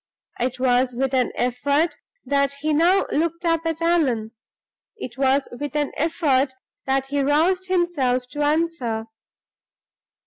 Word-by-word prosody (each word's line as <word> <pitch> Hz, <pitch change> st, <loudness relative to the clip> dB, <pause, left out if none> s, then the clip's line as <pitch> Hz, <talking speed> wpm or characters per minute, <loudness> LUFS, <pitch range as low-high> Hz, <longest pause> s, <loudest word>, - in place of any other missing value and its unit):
It 250 Hz, +1 st, -2 dB
was 250 Hz, -1 st, +2 dB
with 265 Hz, +1 st, -1 dB
an 255 Hz, -2 st, +2 dB
effort 285 Hz, +6 st, +1 dB, 0.3 s
that 280 Hz, -1 st, +1 dB
he 300 Hz, +2 st, -2 dB
now 345 Hz, +6 st, +4 dB
looked 335 Hz, +3 st, -1 dB
up 330 Hz, -1 st, +1 dB
at 325 Hz, 0 st, -2 dB
Allan; 265 Hz, -11 st, +1 dB, 0.7 s
it 255 Hz, -, -7 dB
was 270 Hz, +1 st, +2 dB
with 290 Hz, -1 st, -5 dB
an 295 Hz, -1 st, 0 dB
effort 285 Hz, -4 st, +1 dB, 0.3 s
that 270 Hz, 0 st, +1 dB
he 285 Hz, 0 st, 0 dB
roused 335 Hz, +7 st, +2 dB
himself 295 Hz, -9 st, 0 dB
to 295 Hz, -, -4 dB
answer. 295 Hz, -7 st, 0 dB
285 Hz, 135 wpm, -23 LUFS, 260-330 Hz, 0.7 s, now